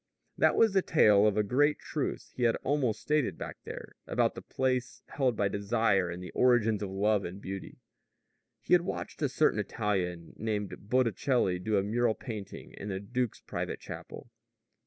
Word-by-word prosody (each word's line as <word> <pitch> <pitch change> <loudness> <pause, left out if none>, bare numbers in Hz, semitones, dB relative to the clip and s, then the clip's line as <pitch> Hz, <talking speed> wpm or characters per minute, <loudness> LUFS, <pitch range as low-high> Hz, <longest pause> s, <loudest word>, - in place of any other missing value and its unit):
That - - +3
was 225 -3 +4
the 190 - +4
trail 105 - +5
of 105 0 +1
a 105 - +3
great 145 +8 +2
truth 150 - -4
he - - -6
had 115 -1 +4
almost 130 -5 0
stated 150 -3 +1
back - - -6
there, - - -8
about - - +1
the - - -8
place 130 -1 -2
held 130 -4 +1
by 100 -1 +1
desire 100 -2 +1
in 85 +1 -6
the 90 - -8
origins 115 -4 +3
of 100 - -3
love 100 +1 +1
and 90 +3 -6
beauty. 95 -1 -7 0.8
He - - 0
had 175 - +7
watched 175 - -5
a 145 - +2
certain 140 -4 +2
Italian 95 -5 -2
named 105 -2 -4
Botticelli 120 -5 +2
do 105 +3 0
a 95 - +2
mural 115 +2 +1
painting 110 -6 -8
in 100 - -6
the 95 -1 -2
duke's 120 +3 -2
private - - -4
chapel. - - -9
110 Hz, 180 wpm, -30 LUFS, 100-125 Hz, 0.8 s, had